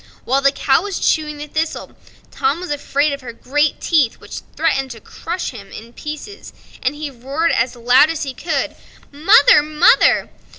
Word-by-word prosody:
While 270 +2 +1
the 275 0 +4
cow 270 -1 +1
was 400 -2 -4
chewing 305 -2 0
the 295 - -6
thistle 315 +2 -4 0.4
Tom 445 -6 -1
was 360 -3 -6
afraid 285 0 0
of 280 - -6
her 240 -2 -8
great 290 +6 -1
teeth, 295 -9 +1
which - - -9
threatened 270 -5 0
to 235 -2 -9
crush 345 - -5
him 200 -6 -12
in 230 +2 -11
pieces, 305 +10 -8 0.3
and 260 +3 -1
he 295 -1 -6
roared 275 +7 -2
out - - +1
as 240 +2 -1
loud 245 +5 +4
as 325 -1 -3
he 270 -2 -5
could: 290 0 -3 0.4
"Mother, 345 +6 +5
mother!" 305 +2 +3
295 Hz, 180 wpm, -18 LUFS, 265-320 Hz, 0.4 s, Mother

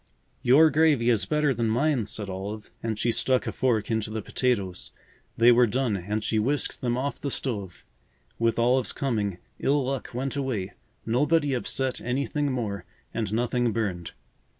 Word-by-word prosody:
"Your 150 +6 +6
gravy 145 -6 +4
is 110 -3 +1
better 150 -2 +2
than 115 -1 0
mine," 125 -1 +1
said 105 -1 -4
Olive 100 +3 -6
and 110 -2 -2
she 120 +2 +1
stuck 130 +2 +2
a - - -2
fork 115 -4 0
into 110 -1 0
the 110 -1 -4
potatoes. 100 -9 -1 0.5
They 120 +1 +7
were 120 0 +5
done 120 -1 0
and 105 +4 -3
she 110 0 +1
whisked 140 +7 -1
them 120 -1 0
off 140 +2 -2
the 140 - -2
stove. 105 -10 -4 0.5
With 115 0 +1
Olive's 125 0 +2
coming, 105 -9 -1 0.2
ill 140 -1 +1
luck 135 0 -3
went 130 +3 -3
away. 130 -9 -2 0.3
Nobody 145 +5 +2
upset 130 +1 -1
anything 140 +3 -1
more, 105 -7 -3 0.3
and 110 -4 -2
nothing 120 +1 +1
burned. 100 -6 -3
120 Hz, 165 wpm, -26 LUFS, 110-135 Hz, 0.5 s, They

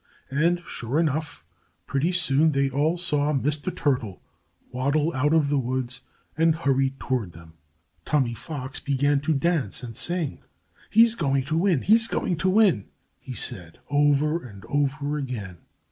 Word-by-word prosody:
And 170 +5 +1
sure 125 +6 -2
enough! 150 - -2 0.4
Pretty 145 +6 0
soon 160 -4 +3
they 140 0 +1
all 150 +6 +1
saw 150 -4 +1
Mr. 150 +4 -1
Turtle 125 - -1 0.5
waddle 140 +6 0
out 145 +3 +1
of 160 -3 +3
the 145 -1 +2
woods 125 -1 -3 0.3
and 165 0 +3
hurry 135 -4 +1
toward 115 -10 -2
them. 80 0 -14 0.5
Tommy 130 -3 +1
Fox 130 +2 -6
began 140 +1 +1
to 155 +2 +1
dance 140 - -1
and 115 -2 -7
sing. 170 +3 -3 0.5
"He's 230 +1 +6
going 140 - 0
to 155 +4 -2
win! 175 -5 +2
He's 225 +2 +5
going 180 -5 -1
to 185 +3 +1
win!" 185 - +3 0.3
he 130 - -8
said, 90 -6 -5
over 145 +3 +2
and 105 -4 -11
over 145 +1 0
again. 105 - -6
145 Hz, 150 wpm, -25 LUFS, 130-160 Hz, 0.5 s, He's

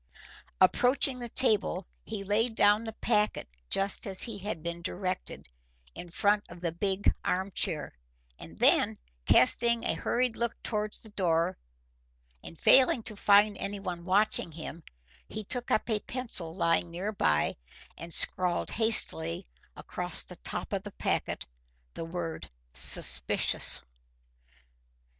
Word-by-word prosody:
Approaching 255 +1 +2
the 240 -1 -7
table, 210 -7 +2 0.2
he 210 -2 -6
laid 220 +4 0
down 205 +1 +3
the 225 - -6
packet 210 -1 -1 0.2
just 195 +1 0
as 190 -1 +3
he 225 -4 -4
had 195 -5 -6
been 170 0 -5
directed, 185 - -5 0.5
in 175 - -10
front 205 +4 +1
of 175 - -12
the 170 -1 -3
big 190 +3 0
arm 190 +2 -2
chair, - - -2 0.5
and - - -12
then, - - +2 0.3
casting 235 - +3
a - - 0
hurried 245 -1 -1
look 235 -1 -3
towards 210 -2 -3
the 220 - -9
door 175 -2 0 0.9
and 165 - -11
failing 255 +2 +4
to 215 - -4
find 205 +1 +3
anyone 195 -4 -5
watching 195 -1 +2
him, 160 +1 -9 0.5
he 215 - -6
took 245 +4 -2
up - - 0
a 220 -3 0
pencil 225 -9 -5
lying 170 0 0
near 180 +5 -5
by 75 - 0 0.4
and 170 +1 -10
scrawled 180 +1 0
hastily 85 - -1 0.3
across - - 0
the - - -7
top - - -5
of - - -1
the - - -10
packet - - -3 0.5
the - - -6
word 165 - -6 0.2
"Suspicious." 65 0 +6
200 Hz, 135 wpm, -28 LUFS, 170-220 Hz, 0.9 s, Suspicious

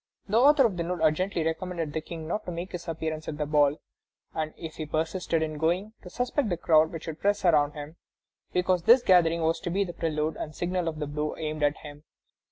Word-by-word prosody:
The 215 +3 +3
author 280 +1 +6
of 200 -6 0
the 170 - -1
note 180 +1 -3
urgently 165 +3 +1
recommended 165 -1 -3
the 160 - -2
King 160 0 -7
not 210 +6 -2
to - - -4
make 170 +2 -5
his 180 -1 -7
appearance 160 -1 -4
at 150 - -4
the 150 - -1
ball, 145 0 +3 0.6
and, 155 -1 -2
if 160 -1 -8
he 155 - -4
persisted 165 +1 -1
in 155 -1 -4
going, 180 +7 0
to 180 - -10
suspect 245 +3 -1
the 175 - -1
crowd 160 -1 +4
which 165 -1 -7
would 160 -1 -6
press 205 -1 +1
around 150 -4 +4
him, 150 +2 -9 0.5
because 180 0 +1
this 235 +8 +6
gathering 170 -4 +4
was 165 +1 +1
to 175 - -4
be 195 +4 +1
the 175 -3 -6
prelude 155 -1 -2
and 155 -1 -6
signal 180 0 -1
of 160 -1 -3
the 150 - -3
blow 150 +1 -3
aimed 155 -1 -4
at 145 0 +2
him. 145 0 -11
165 Hz, 230 wpm, -27 LUFS, 155-180 Hz, 0.6 s, author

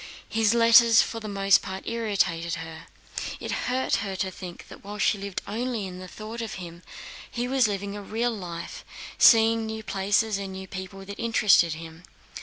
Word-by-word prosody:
His 220 0 +2
letters 230 0 +7
for 230 - -5
the 215 - -7
most 195 -1 +3
part 190 -1 -7
irritated 200 -7 0
her. 160 0 -9 0.5
It - - -5 0.2
hurt 255 +1 +1
her 200 -2 -4
to 190 0 -2
think 180 -1 -9
that - - -13
while 205 +1 -7
she 210 0 +2
lived 200 -1 -5
only 230 0 -3
in 180 -1 -8
the 185 - -8
thought 215 +5 -7
of 225 - -5
him, 170 -2 -9 0.5
he 240 +1 -3
was 260 -2 +3
living 200 0 -4
a 205 - -6
real 230 +4 -1
life, 175 -5 -7 0.4
seeing 225 -1 +6
new 220 0 -5
places 205 +1 +1
and 195 -1 -5
new 190 0 -7
people 190 +1 -8
that 200 +1 -9
interested 210 -8 +4
him. 165 0 -10
200 Hz, 185 wpm, -26 LUFS, 190-225 Hz, 0.5 s, letters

